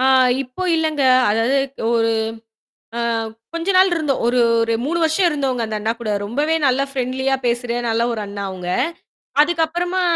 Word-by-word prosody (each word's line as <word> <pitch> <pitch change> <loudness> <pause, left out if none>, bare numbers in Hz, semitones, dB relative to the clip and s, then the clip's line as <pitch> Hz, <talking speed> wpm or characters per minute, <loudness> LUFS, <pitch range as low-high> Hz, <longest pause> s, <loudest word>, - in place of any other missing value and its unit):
ஆ 260 - +2 0.4
இப்போ 255 +8 -8
இல்லங்க. 310 -3 0 0.3
அதாவது 225 +5 +1 0.4
ஒரு 230 -1 +2 0.9
ஆ - - -2 0.5
கொஞ்ச 335 +3 -3
நாள் 380 +1 +6
இருந்த 305 -4 0
ஒரு 240 +1 +1 0.2
ஒரு 230 0 0
3 340 +4 -1
வருஷம் 320 +3 +2
இருந்தோங்க, 270 -5 -1
அந்த 220 -1 -4
அண்ணாகூட. 225 +1 -2
ரொம்பவே 290 +10 0
நல்லா 265 +1 +2
ஃப்ரண்ட்லியா 265 0 -1
பேசுற 240 0 -1 0.2
நல்லா 230 +1 +1
ஒரு 220 - -4
அண்ணா 200 0 -6
அவுங்க. 180 -2 -6 0.7
அதுக்கு 325 +2 +2
அப்பறமா 355 +3 -2
260 Hz, 155 wpm, -20 LUFS, 230-315 Hz, 0.9 s, நாள்